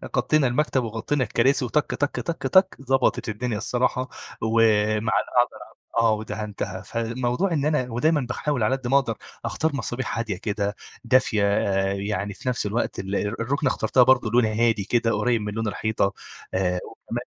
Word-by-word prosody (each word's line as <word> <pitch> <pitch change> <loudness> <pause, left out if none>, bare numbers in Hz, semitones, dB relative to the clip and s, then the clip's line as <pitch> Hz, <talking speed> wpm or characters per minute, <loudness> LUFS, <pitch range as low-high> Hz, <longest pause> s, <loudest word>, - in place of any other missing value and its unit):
غطّينا 135 +2 +3
المكتب 130 0 +1
وغطّينا 115 +5 -1
الكراسي، 130 +4 +2
وتَك، 150 +5 0
تَك، 145 +1 -1
تَك، 170 -3 -3
تَك 190 0 +5
ضبطت 135 -2 +1
الدنيا 110 +1 -2
الصراحة، 125 +3 0 0.3
ومع 110 0 -1 0.9
أقدر 120 -2 +1
أعمل - - -21 0.2
آه، 115 -1 +4
ودهنتها. 105 -3 -4
فالموضوع 120 - -1
إن 145 -3 0
أنا 150 -5 0
ودايمًا 150 +6 +2
باحاول 125 0 -1
على 130 +5 +2
قدّ 130 -2 -6
ما 135 +2 +4
أقدر 115 -6 0 0.3
أختار 160 -2 -1
مصابيح 130 -2 -3
هادية 110 -5 -2
كده، 100 -1 -2 0.3
دافية 120 -4 +3
آآ، 95 -1 +1
يعني 100 0 -3
في 125 - -4
نَفس 125 - -1
الوقت 105 +4 -1
ال 95 +1 -3
الرُكنة 120 +8 -1
اخترتها 125 +3 +3
برضو 125 -3 +4
لونها 115 -1 +3
هادي 115 -2 +2
كده، 115 +2 +1
قريّب 120 -2 +1
من 105 0 -4
لون 110 +1 -2
الحيطة، 110 -1 0 0.4
آآ، 90 -1 +1
وكمان - - -6
115 Hz, 165 wpm, -24 LUFS, 105-130 Hz, 0.9 s, تَك